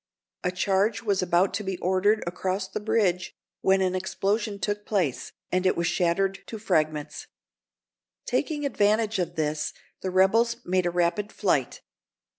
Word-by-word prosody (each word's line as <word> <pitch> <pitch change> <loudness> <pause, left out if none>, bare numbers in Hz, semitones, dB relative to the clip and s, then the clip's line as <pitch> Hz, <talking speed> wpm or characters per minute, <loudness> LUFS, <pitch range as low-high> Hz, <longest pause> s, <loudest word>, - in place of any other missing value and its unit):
A 180 - +1
charge 195 +4 +1
was 200 -4 +1
about 180 +2 +2
to 205 +2 -2
be 190 -2 -3
ordered 190 +4 +2
across 185 +2 -2
the - - -4
bridge, 200 -4 0 0.3
when 190 0 +3
an 185 -1 +1
explosion 200 +3 -1
took 205 +1 -2
place, 180 - -1 0.2
and 185 0 +1
it 185 - +2
was 170 - 0
shattered 190 +3 +1
to 225 - -6
fragments. 155 -7 -1 1.0
Taking 290 +3 -1
advantage 215 -4 +2
of 175 -1 -2
this, 150 -1 -1 0.3
the 190 - -2
rebels 220 +6 +3
made 185 0 +1
a - - +2
rapid 175 +4 0
flight. - - 0
190 Hz, 150 wpm, -26 LUFS, 180-210 Hz, 1.0 s, when